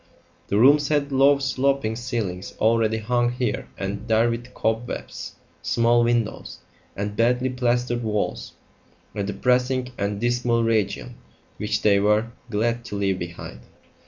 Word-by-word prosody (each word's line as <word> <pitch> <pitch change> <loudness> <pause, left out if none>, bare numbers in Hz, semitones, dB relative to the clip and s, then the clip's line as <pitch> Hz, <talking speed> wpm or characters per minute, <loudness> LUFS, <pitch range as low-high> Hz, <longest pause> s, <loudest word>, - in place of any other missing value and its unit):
The 100 - 0
rooms 145 +5 +5
had 145 -2 0
low 140 +1 +5
sloping 135 -3 0
ceilings 110 -7 -4
already 110 0 +2
hung 120 +2 0
here 125 -3 -2
and 100 +3 -4
there 115 +1 +3
with 120 +2 -6
cobwebs, 115 +2 -3 0.3
small 120 0 +3
windows, 120 -2 -1 0.4
and 100 +1 -3
badly 125 +3 +2
plastered 120 -1 0
walls 105 -2 -2 0.6
a 105 - -3
depressing 125 +5 0
and 100 0 -1
dismal 120 0 +1
region 115 +2 -1 0.4
which 105 0 -2
they 100 -2 +5
were 105 +3 +2 0.2
glad 115 +2 0
to 105 - -6
leave 95 -2 0
behind. 85 -7 -7
115 Hz, 130 wpm, -24 LUFS, 105-125 Hz, 0.6 s, rooms